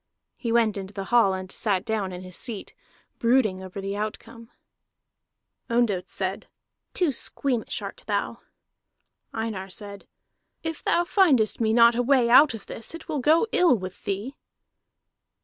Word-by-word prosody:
He 235 - -4
went 225 -3 +2
into 195 +1 -7
the 195 - -3
hall 200 -6 +5
and 185 0 -7
sat 195 -4 -1
down 215 -4 -2
in 180 0 -7
his 185 -1 -7
seat, 220 -5 -4 0.5
brooding 230 -6 +2
over 190 +1 -8
the 195 +1 -4
outcome. 215 +2 -6 1.2
Ondott 210 -6 +1
said: 190 0 -3 0.5
"Too 350 -5 +2
squeamish 255 -1 -2
art - - -8
thou." - - -2 0.9
Einar 220 -4 -4
said: 200 +1 -9 0.6
"If 325 -1 -5
thou 345 - +2
findest 295 - +3
me 220 -1 +2
not 235 +1 +6
a 240 - 0
way 245 -2 +3
out 270 0 +7
of 210 - -10
this, 230 +8 -7
it 330 - -11
will 305 -3 -2
go 310 - +4
ill 345 -9 +4
with 185 -1 -8
thee." 205 +8 -3
225 Hz, 150 wpm, -25 LUFS, 195-255 Hz, 1.2 s, out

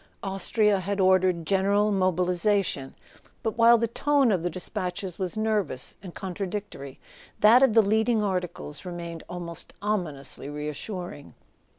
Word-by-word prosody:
Austria 200 +1 +1
had 200 +2 -3
ordered 185 -3 +3
gen¬ 190 +2 +2
eral 205 +1 +2
mobilisation; 185 -4 0 0.5
but 225 - -1
while 235 0 +6
the 230 - +1
tone 275 +1 +2
of 185 -4 +1
the 175 - -1
despatches 180 +1 -4
was 185 +2 -3
nervous 210 -12 -1
and 180 -3 -10
contradictory 190 -7 -5 0.4
that 225 +4 +7
of 265 -5 +4
the 225 - +7
leading 220 +2 +2
articles 180 -6 -3
remained 170 -2 -6
almost 170 -2 -7
ominously 160 -10 -3
reassuring. 150 +2 -6
190 Hz, 130 wpm, -26 LUFS, 175-210 Hz, 0.5 s, that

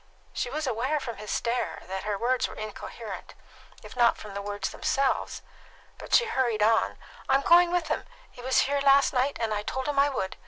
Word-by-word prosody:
She 245 - -2
was 305 +4 -3
aware 260 +5 0
from 240 -5 -6
his 210 0 -8
stare 235 +1 -2
that 190 +2 -5
her 210 -1 -1
words 250 +4 +1
were - - -10
incoherent, 215 -1 -8 0.5
if - - -11
not 240 -2 +4
from 210 -2 -9
the 200 - -4
words 205 -1 -4
themselves, 270 -1 -1 0.6
but - - +1
she 485 - +5
hurried 240 - 0
on: 225 +1 +2 0.3
"I - - +5
am 275 - +3
going 345 +3 +6
with 350 -2 0
him. - - -1 0.3
He 245 - -12
was 260 +1 +3
here 280 +1 0
last 275 0 +5
night, 265 +2 +1
and 225 -2 -1
I 205 - -1
told 260 +5 -4
him 290 -1 0
I 285 +1 +5
would. 190 -9 -3
250 Hz, 210 wpm, -27 LUFS, 215-275 Hz, 0.6 s, going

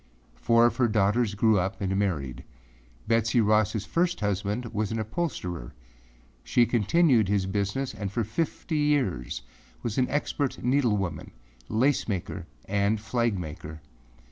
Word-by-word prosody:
Four 115 +1 +4
of 120 - +1
her 125 -2 +3
daughters 105 +1 +2
grew 110 -1 +4
up 95 +5 -2
and 95 -2 -1
married. 75 -11 -1 0.6
Betsey 115 +1 +2
Rossâ 105 -1 +2
first 175 +7 0
husband 105 +3 -1
was 105 0 -1
an 115 - -1
upholsterer. 105 - -4 0.7
She 120 - +3
continued 120 - +3
his 100 -1 +1
business 100 +7 -2
and 100 -2 -4
for 115 +3 0
fifty 155 - -2
years 125 - 0 0.4
was 115 +2 -1
an 125 - +2
expert 145 -1 -1
needlewoman, 110 - 0 0.4
lace 130 +6 +2
maker 95 -5 -4 0.2
and 100 +2 +1
flag 115 -1 0
maker. 80 -2 -7
110 Hz, 135 wpm, -27 LUFS, 100-120 Hz, 0.7 s, Four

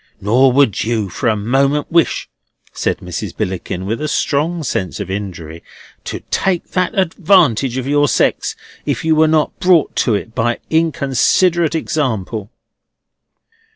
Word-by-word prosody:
Nor 125 +6 +3
would 135 -7 +3
you 110 -3 -1
for 105 - -1
a 110 - +2
moment 135 +7 0
wish," 170 0 +2 0.5
said - - -1
Mrs. - - -6
Billickin, 90 0 -3
with 110 +6 -3
a 155 - -1
strong 155 +3 0
sense 95 -8 -3
of 95 -2 -5
injury, 85 -5 -6 0.4
"to - - -5
take 185 -3 0
that 185 +4 -1
advantage 165 - +2
of 130 - -3
your 145 +1 +2
sex, - - +1 0.3
if - - -2
you 160 -1 +3
were 160 +1 +4
not 155 -1 +1
brought 180 -4 +3
to 115 - +2
it 110 +2 -5
by 120 0 0
inconsiderate 160 +2 +2
example." 110 - -2
135 Hz, 145 wpm, -17 LUFS, 110-160 Hz, 0.5 s, were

